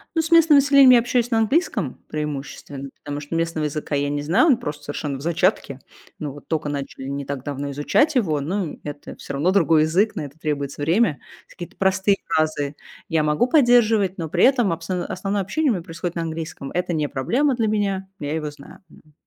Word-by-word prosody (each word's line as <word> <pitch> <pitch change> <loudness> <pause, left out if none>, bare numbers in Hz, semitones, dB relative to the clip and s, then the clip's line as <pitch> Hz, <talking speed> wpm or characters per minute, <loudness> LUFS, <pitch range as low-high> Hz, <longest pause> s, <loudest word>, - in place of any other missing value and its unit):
Ну, 325 - +3
с 320 - -4
местным 330 -3 +7
населением 275 -1 +6
я 245 - +7
общаюсь 240 0 0
на 225 - +3
английском 285 - 0
преимущественно, 140 -2 -6
потому 145 0 -4
что 145 +3 -6
местного 165 -2 -1
языка 150 0 -3
я 140 0 0
не 145 0 -2
знаю. 165 - +3
Он 275 -7 +4
просто 150 -10 -6
совершенно 145 -1 -4
в - - -10
зачатке. 170 -4 0 0.4
Ну, 145 -3 -5
вот 145 - -14
тока 155 -2 -2
начали 140 -2 -5
не 140 0 -4
так 140 -2 -5
давно 140 0 -4
изучать 285 - +2
его. 170 - +1
Ну 175 +3 -2
и - - -14
это 145 -1 -8
всё 140 - -8
равно 150 +6 +1
другой 165 -5 +4
язык, 190 +8 +1
на 160 - -3
это 145 +2 -12
требуется 145 -2 -3
время. 165 -1 +2 0.3
Какие-то 175 -2 -10
простые 190 +1 +2
фразы 155 -2 0 0.3
я 160 -2 +1
могу 150 +10 +2
поддерживать, 230 - +3
но 160 -2 -3
при - - +1
этом 245 -8 +4
абсо 170 +2 -3
основное 195 +2 -2
общение 265 - 0
у - - +2
меня 175 -4 -4
происходит 170 +1 -5
на 170 - -2
английском. 160 -4 -5
Это 180 0 -1
не 150 -2 -1
проблема 255 - +1
для 225 -2 0
меня, 195 -3 -1
я 145 +1 -3
его 155 -2 -3
знаю, 145 -1 -14
м. 155 - -20
165 Hz, 210 wpm, -22 LUFS, 145-210 Hz, 0.4 s, местным